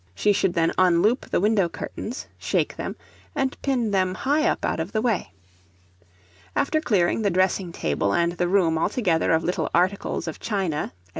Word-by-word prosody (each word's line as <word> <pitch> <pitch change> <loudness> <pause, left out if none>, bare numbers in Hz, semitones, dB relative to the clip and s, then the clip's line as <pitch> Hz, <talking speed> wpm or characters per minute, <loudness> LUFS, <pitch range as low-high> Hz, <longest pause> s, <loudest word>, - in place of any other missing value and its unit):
She 205 - +3
should 190 -2 +1
then 165 -1 +2
unloop 185 +7 +3
the - - +1
window 200 -2 +2
curtains, 230 +7 -6
shake - - 0
them, - - -5 0.4
and 270 -2 0
pin 245 -6 0
them 185 -2 +1
high 295 - +1
up - - -1
out - - -1
of 165 +4 -4
the 215 - +1
way. 225 - 0 1.2
After 310 +2 +1
clearing 200 - +1
the 205 - +2
dressing 185 0 +1
table, 80 - -1
and 170 +8 +2
the 175 0 -1
room 175 -4 +2
altogether 180 -3 +1
of 160 0 +2
little 180 - -1
articles 185 +1 0
of 160 - -5
china, 190 -8 -2
&c. 90 - -36
185 Hz, 175 wpm, -24 LUFS, 170-215 Hz, 1.2 s, She